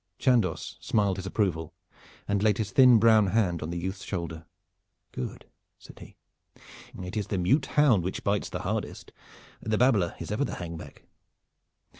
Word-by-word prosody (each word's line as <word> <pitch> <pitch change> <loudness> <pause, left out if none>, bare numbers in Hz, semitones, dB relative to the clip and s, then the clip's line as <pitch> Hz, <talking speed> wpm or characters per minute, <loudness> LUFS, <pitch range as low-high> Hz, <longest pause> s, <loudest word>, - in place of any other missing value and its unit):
Chandos 115 - +1
smiled 100 -3 0
his 95 0 -5
approval 85 -6 -1 0.5
and 100 -1 0
laid 105 -2 +3
his 105 -2 -3
thin 125 -3 +7
brown 110 -2 +5
hand 95 -5 +1
on 75 - -4
the 85 - -4
youth's 95 +3 -4
shoulder. 85 -3 -5 0.6
"Good!" 65 - -6 0.3
said - - -15
he. - - -13 0.9
"It 90 +4 -7
is 105 -2 -2
the 100 - -2
mute 100 - +2
hound 130 - +3
which 95 - -4
bites 100 0 0
the - - -5
hardest. - - -4 0.5
The 110 0 -1
babbler 110 -9 +2
is - - -6
ever 105 +7 0
the - - -3
hang 85 -2 -6
back. 75 -3 -11
100 Hz, 165 wpm, -27 LUFS, 85-110 Hz, 0.9 s, thin